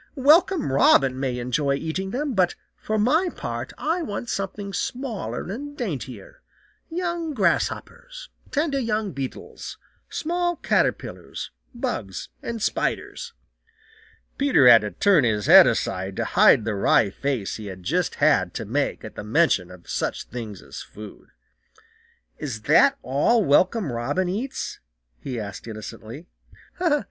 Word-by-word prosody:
"Welcome 315 - +4
Robin 135 -1 +4
may 130 -2 -1
enjoy 130 +3 0
eating 160 +6 -3
them, 275 +5 -2
but 185 -4 +2 0.2
for 215 - -3
my 310 - +3
part - - -5
I 330 +4 -1
want 240 -5 -4
something 200 0 -4
smaller 245 +1 -4
and 290 +6 -7
daintier, 135 - -6 0.5
young 340 -2 -3
grasshoppers, - - -1 0.2
tender 290 -1 0
young 215 -4 -1
beetles, 135 -4 -7 0.3
small 350 +2 -1
caterpillars, - - -1 0.2
bugs 175 - -4
and 230 -2 -4
spiders." 475 -1 -2 1.1
Peter 275 - +5
had 115 -3 +9
to 105 - -3
turn 185 - +3
his 105 -4 +1
head - - +9
aside 95 0 -1
to - - -1
hide 110 - +5
the 110 - -1
wry 100 +1 +3
face 130 -4 -2
he 105 -3 -7
just 90 - -1
had - - +2
to - - -4
make - - -1
at - - -8
the - - -7
mention 110 - +2
of 90 -2 -14
such - - -2
things 110 -5 -8
as - - -9
food. 105 0 -12 1.1
"Is 120 -8 -5
that 270 - +5
all 165 - +2
Welcome 180 - +3
Robin 120 +11 -1
eats?" 235 +9 -4 0.4
he 125 -3 -5
asked 100 +1 -7
innocently. 115 +6 -8
180 Hz, 135 wpm, -24 LUFS, -, 1.1 s, had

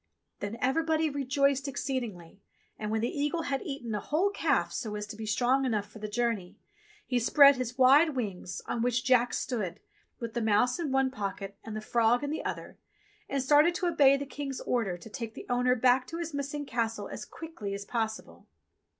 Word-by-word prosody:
Then 205 +3 -4
everybody 315 +3 +1
rejoiced 275 0 +1
exceedingly, 225 -10 -4 0.4
and 210 - -3
when 220 0 0
the 235 - -2
eagle 295 +3 0
had 275 -2 -1
eaten 275 - -5
a 210 - -1
whole 330 - +1
calf - - +1
so 220 -5 -3
as 210 0 -4
to 210 +1 -9
be 220 0 -6
strong 250 +5 +2
enough 220 -6 0
for 220 - -11
the 215 - -4
journey, 220 -4 -2 0.5
he 250 -2 +1
spread 280 +3 +7
his 250 0 -4
wide 280 +4 +6
wings, 195 -7 -4
on 235 - -2
which 245 0 +1
Jack 245 -1 +3
stood, 210 -7 -3 0.4
with 230 -2 -5
the 240 - -1
mouse 220 +6 +2
in 315 -5 -2
one 270 0 +2
pocket 200 -4 -5
and 220 -1 -7
the 215 - -4
frog 235 +3 +2
in 285 - -2
the 310 - -3
other, - - -5 0.5
and 275 -1 0
started 295 +5 +5
to 365 - -1
obey 275 -5 +5
the 280 - -4
King's 280 -1 -5
order 220 -8 -1
to 175 - -12
take 225 -1 -6
the - - -8
owner 250 +1 +3
back 255 +1 +3
to 330 - -6
his 335 -2 -4
missing 285 +1 -3
Castle 230 -3 -2
as - - -7
quickly 230 -12 -7
as 200 0 -6
possible. 220 -1 -4
250 Hz, 200 wpm, -29 LUFS, 220-280 Hz, 0.5 s, spread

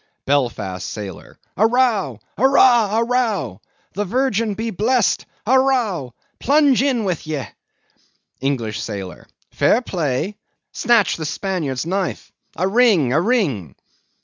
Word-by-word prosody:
BELFAST 110 -10 -1
SAILOR. 100 -5 -8 0.2
A 220 - +5
row! 225 - +1 0.2
arrah 240 -4 +4
a 230 - +3
row! 225 - -1 0.3
The 205 - -1
Virgin 230 -1 0
be 225 +2 -3
blessed, 225 +4 +1 0.2
a 260 +4 +4
row! 215 - 0 0.2
Plunge 280 -2 +3
in 260 -5 +1
with 180 -5 -3
ye! 150 -4 -2 1.0
ENGLISH 125 -6 -2
SAILOR. 100 -4 -7 0.2
Fair 235 - +2
play! 175 - -2 0.3
Snatch 230 -5 +2
the 160 - -5
Spaniard's 160 -8 -3
knife! 190 +2 -3 0.2
A 185 - 0
ring, 195 - +3
a 155 - +3
ring! 160 - 0
195 Hz, 120 wpm, -20 LUFS, -, 1.0 s, A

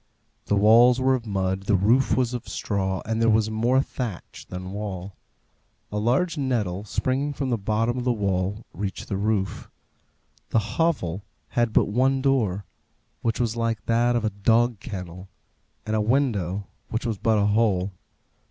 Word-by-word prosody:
The 105 - +1
walls 115 +5 +6
were 130 0 +3
of 120 -3 -2
mud, 95 -1 -1
the 105 - +4
roof 115 +8 +3
was 125 -1 +1
of 125 -1 -5
straw, 95 -3 -2
and 115 0 -1
there 115 - +4
was 110 0 +2
more 120 +5 +2
thatch 115 -11 -6
than 90 0 -6
wall. 100 -2 -5 0.8
A 105 - -1
large 140 +9 +1
nettle, 105 -8 -1
springing 135 +7 -1
from 135 -2 -2
the 120 - +2
bottom 110 +4 0
of - - -3
the 125 - +2
wall, 100 -1 -1
reached 95 +2 -5
the 100 - -1
roof. 100 -2 -1 0.8
The 110 +5 -1
hovel 105 - 0 0.3
had 120 -2 +1
but - - +4
one 130 +5 +2
door, 115 -8 +1 0.6
which 115 -1 -1
was 115 -2 0
like 115 -3 -1
that 120 +1 +2
of 115 -2 0
a 110 - 0
dog 115 +3 +2
kennel; 95 -4 -7 0.6
and 110 - -1
a 110 - +2
window, 105 - 0 0.2
which 115 +2 -2
was 110 -4 -2
but 110 -1 +2
a 100 - +3
hole. 100 -3 +2
110 Hz, 170 wpm, -25 LUFS, 100-120 Hz, 0.8 s, walls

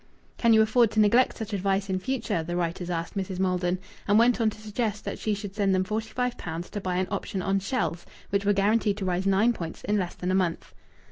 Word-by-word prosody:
"Can 235 - +4
you 220 -1 +7
afford 225 +1 +4
to 220 - +1
neglect 235 +5 +4
such 220 -1 -5
advice 195 0 0
in 190 -1 -1
future?" 240 -6 -1
the 175 +2 -4
writers 175 0 -2
asked 165 +1 -3
Mrs. 190 -1 -3
Maldon, 180 -1 +1 0.3
and 205 +1 +4
went 235 +1 +4
on 220 - +4
to 215 - -10
suggest 215 0 -3
that - - -4
she 215 -1 0
should 200 -1 -7
send 200 -2 +2
them 185 - +2
forty 215 +3 -3
five 250 -1 -2
pounds 165 +1 -5
to 205 - -4
buy 185 -1 -2
an 185 +1 0
option 190 -2 -3
on 195 0 +1
"Shells," 195 -5 -2 0.3
which 200 0 +1
were 205 - +3
guaranteed 205 +1 +2
to 200 - -3
rise 185 +1 0
nine 205 +5 +4
points 165 -6 -7
in 210 0 +1
less 180 -2 -3
than 180 +1 -2
a - - +1
month. 185 -3 -1
200 Hz, 245 wpm, -27 LUFS, 185-220 Hz, 0.3 s, you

